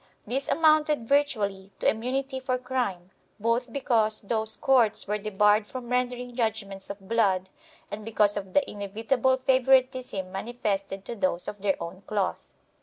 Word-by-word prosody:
This 265 +5 -2
amounted 305 -5 +3
virtually 205 -9 0
to - - 0
immunity 260 +4 -1
for 255 -1 -1
crime, 245 -8 -3 0.3
both 230 +3 0
because 225 -5 +1
those 220 +1 -1
courts 250 -8 +2
were 210 +1 -1
debarred 210 +1 +3
from 250 0 -7
rendering 250 0 -1
judgements 215 -5 -2
of 200 -1 -8
blood 190 -5 +1 0.4
and 210 +1 -5
because 210 -2 +2
of 195 -2 -5
the 290 - +4
inevitable 225 +6 0
favoritism 255 -6 +2
manifested 195 -2 -3
to 235 - -5
those 185 -4 0
of 205 -2 -6
their 195 -1 +2
own 175 +3 -7
cloth. 205 -3 -2
225 Hz, 145 wpm, -27 LUFS, 200-255 Hz, 0.4 s, the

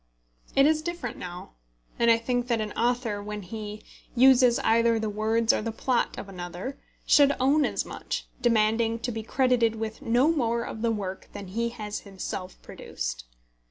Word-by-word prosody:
It 275 - +6
is 310 +1 +3
different 340 -7 -5
now; 180 0 -8 0.5
and 235 - +4
I 230 - +6
think 245 +1 -1
that 235 -2 +1
an 215 -1 -3
author, 235 -3 0
when 210 0 -6
he 210 +2 -7 0.3
uses 250 -1 +6
either 230 0 +3
the 220 -1 -2
words 220 +2 +2
or - - 0
the 225 +1 -3
plot 240 +2 0
of - - -6
another, 180 +6 -7 0.3
should 285 -1 +6
own 280 +3 +3
as - - -1
much, - - -5 0.2
demanding 225 -1 +2
to 245 +2 -3
be 225 -1 -4
credited 240 -1 +2
with 220 0 -5
no 245 +6 +3
more 235 -6 0
of 220 - -6
the 230 - +1
work 195 -3 -5
than 200 -2 -8
he 230 +4 -1
has 210 -3 -5
himself 190 -1 -7
produced. - - -6
230 Hz, 175 wpm, -27 LUFS, 210-245 Hz, 0.5 s, It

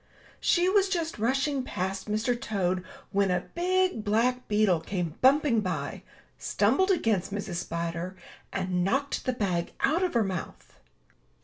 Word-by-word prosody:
She 350 +1 +3
was 390 0 +3
just 330 - -2
rushing 270 +4 +1
past 190 -4 -4
Mr. 215 +4 +1
Toad 185 -6 -1 0.3
when 200 -1 +2
a 180 - 0
big 370 -7 +1
black 235 +4 +1
beetle 210 -5 +3
came 175 -2 -3
bumping 270 -2 +5
by, 165 -8 -3 0.4
stumbled 380 +1 +2
against 220 - +1
Mrs. 195 -3 -3
Spider, 170 +2 -3 0.4
and 185 -2 -1
knocked 270 +9 0
the 255 - +1
bag 185 -7 -1
out 315 +6 +2
of 365 -7 0
her 230 - +4
mouth. 185 -3 -6
215 Hz, 140 wpm, -28 LUFS, 185-280 Hz, 0.4 s, bumping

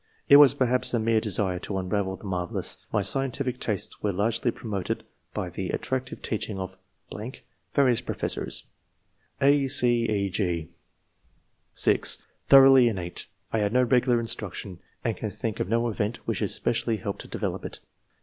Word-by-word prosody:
It 140 - +9
was 145 -2 +8
perhaps 125 -2 +1
a - - +1
mere 110 0 +2
desire 95 -4 0
to 95 - -4
unravel 95 +1 -1
the - - -17
marvellous. 90 -3 -3
My 105 -2 +1
scientific 135 +3 0
tastes 105 -4 -2
were 105 - 0
largely 115 +5 0
promoted 105 -5 -4 0.3
by - - -4
the - - -4
attractive 130 -1 -3
teaching 110 -2 -3
of 95 0 -6 0.4
[.... 125 +5 -12
various 125 -4 +3
professors]." - - -2 0.8
(a, 140 0 +4
c, 120 -3 +4
e, 100 -2 0
g) 85 -5 -2 1.1
(6) - - +3 0.2
" - - -44
Thoroughly 135 -2 +8
innate. 90 -5 -5 0.3
I 110 - +2
had 105 +1 0
no 125 0 +4
regular 125 -1 +3
instruction, 100 -5 -4 0.2
and 115 -2 -1
can 110 - -4
think 110 +2 -4
of - - -2
no 115 +2 +1
event 110 0 -2
which - - -2
especially 115 -1 0
helped 100 -2 -5
to - - -11
develop - - -4
it. - - -7
115 Hz, 160 wpm, -26 LUFS, 100-125 Hz, 1.1 s, It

